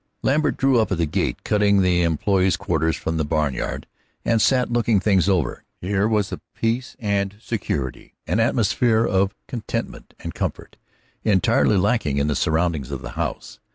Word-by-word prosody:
Lambert 150 +2 +1
drew 135 -2 +3
up 110 - 0
at 95 - +1
the 85 - +1
gate 75 - -2
cutting 100 -2 +3
the 90 -1 +2
employees' 95 +3 +2
quarters 80 0 0
from 80 0 -3
the 80 - +1
barnyard, 75 -2 -2 0.4
and 115 -1 +2
sat 125 +3 +2
looking 115 -3 +2
things 95 -1 +2
over. 90 -10 0 0.2
Here 100 +3 0
was 105 -3 0
a - - -6
peace 115 +3 -2
and 100 -4 -1
security, 75 - -4
an 105 - 0
atmosphere 115 0 +2
of 95 0 +1
contentment 120 -4 -5
and - - -6
comfort, - - -5 0.5
entirely 110 0 +3
lacking 95 - +1
in 70 - +2
the 75 -1 0
surroundings 80 -4 0
of 70 -3 -5
the - - -6
house. - - -5
100 Hz, 165 wpm, -22 LUFS, 85-115 Hz, 0.5 s, drew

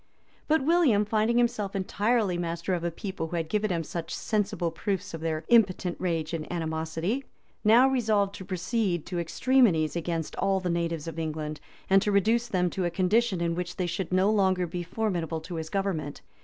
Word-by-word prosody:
But 310 -2 +3
William, 295 -11 +4
finding 220 +2 +1
himself 235 -5 0
entirely 205 +1 +1
master 170 +1 -2
of 175 -2 -1
a 170 - 0
people 180 -1 -5
who 175 - -5
had 165 -2 -1
given 210 +4 0
him 165 -2 0
such 165 +1 -5
sensible 200 -5 -1
proofs 190 +2 -3
of 165 - -6
their 160 -1 -2
impotent 190 -6 +3
rage 165 -3 -1
and 160 -2 -4
animosity, 165 +7 -2 0.4
now 230 +5 +6
resolved 215 -6 +1
to 195 - -8
proceed 185 -1 -1
to 180 -1 -3
extremities 170 - +2
against 165 -2 -3
all 195 -1 +1
the 180 -2 -2
natives 170 -2 -2
of 165 0 -5
England; 155 -1 -4 0.3
and 195 0 +5
to 210 - 0
reduce 225 +4 +2
them 180 -6 0
to 185 - -2
a - - +1
condition 190 +2 +1
in 170 0 0
which 180 +1 -4
they 180 - -1
should 175 +1 -3
no 185 +3 +3
longer 190 -3 +2
be 175 +1 -4
formidable 175 -4 -2
to 175 +3 -8
his 160 0 -5
government. 185 -7 -2
180 Hz, 190 wpm, -27 LUFS, 165-210 Hz, 0.4 s, now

